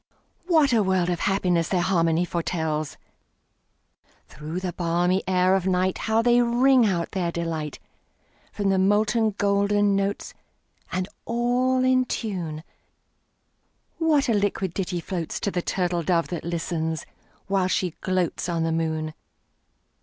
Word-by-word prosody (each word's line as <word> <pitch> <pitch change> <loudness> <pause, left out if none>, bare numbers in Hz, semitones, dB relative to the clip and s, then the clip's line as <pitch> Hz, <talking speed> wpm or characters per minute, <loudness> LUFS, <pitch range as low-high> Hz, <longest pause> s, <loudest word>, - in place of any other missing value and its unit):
What 310 -7 +4
a 225 - +4
world 185 -2 +1
of 175 - -2
happiness 180 -4 +1
their 180 -2 +1
harmony 170 -2 +2
foretells! 160 -3 -2 1.3
Through 155 +4 -6
the 180 -2 -3
balmy 175 +2 +1
air 185 0 +3
of 190 -2 -1
nightHow 190 +4 +1
they 240 0 +4
ring 245 0 +4
out 170 -4 -1
their 180 -3 -1
delight! 165 -3 -4 0.7
From 200 -1 -1
the 190 - +2
molten 210 +2 +2
golden 200 0 +2
notes, 200 +1 -2 0.6
And 185 0 -2 0.2
all 245 +2 +1
in 255 0 +3
tune, 175 -10 -4 1.4
What 310 -4 +2
a 235 - +2
liquid 200 -3 0
ditty 180 -3 -3
floatsTo 185 +2 -3
the 175 - 0
turtle 175 -1 -1
dove 170 0 +1
that 175 - -4
listens, 160 -1 -3 0.4
while 195 -2 +1
she 185 -1 0
gloatsOn 175 -2 -1
the 165 - 0
moon! 160 -1 -2
185 Hz, 130 wpm, -24 LUFS, 170-205 Hz, 1.4 s, What